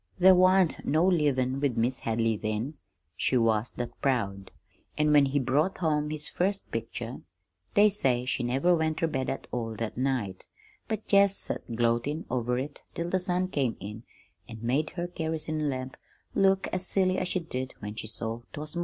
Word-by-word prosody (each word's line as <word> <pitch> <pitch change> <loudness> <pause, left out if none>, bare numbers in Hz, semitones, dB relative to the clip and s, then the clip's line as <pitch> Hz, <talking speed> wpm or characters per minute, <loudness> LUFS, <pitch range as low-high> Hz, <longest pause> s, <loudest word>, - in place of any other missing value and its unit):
"There 190 +1 +8
wan't 185 -1 +4
no 160 +4 +2
livin' 140 -7 +2
with 140 -4 0
Mis' 120 +3 +1
Hadley 115 0 0
then, 110 +6 -2 0.4
she 130 - +2
was 115 -1 +2
that 120 -1 -6
proud; 100 -8 0 0.5
an' 150 0 +3
when 145 -1 +7
he 140 +2 0
brought 145 +8 +1
home 150 -3 0
his 155 0 -1
first 195 +5 -1
picture, 115 +1 -5 0.5
they 210 +1 +6
say 125 -10 +1
she 130 0 -1
never 135 +9 +2
went 160 -1 0
ter - - +1
bed 135 -5 -1
at 135 - -4
all 115 -2 -3
that 115 +2 -4
night, 125 -8 -1 0.4
but 220 -1 -3
jest 200 -1 +5
set - - -4
gloatin' 120 +7 0
over 125 0 0
it 140 +3 -5
till 170 +1 -3
the 190 - +2
sun 180 0 0
came 135 -9 0
in 105 +3 -7 0.5
an' 110 - -7
made 140 +6 +1
her 175 -1 -2
kerosene 160 -3 -1
lamp 130 -1 -4 0.4
look 195 0 +3
as 185 0 -2
silly 185 -1 +2
as 185 - -1
she 185 - 0
did 130 -6 -5
when 105 0 -6
she 110 - -6
saw 115 +1 -4
'twas 150 +2 -5
mornin'. - - -1
140 Hz, 185 wpm, -28 LUFS, 120-175 Hz, 0.5 s, There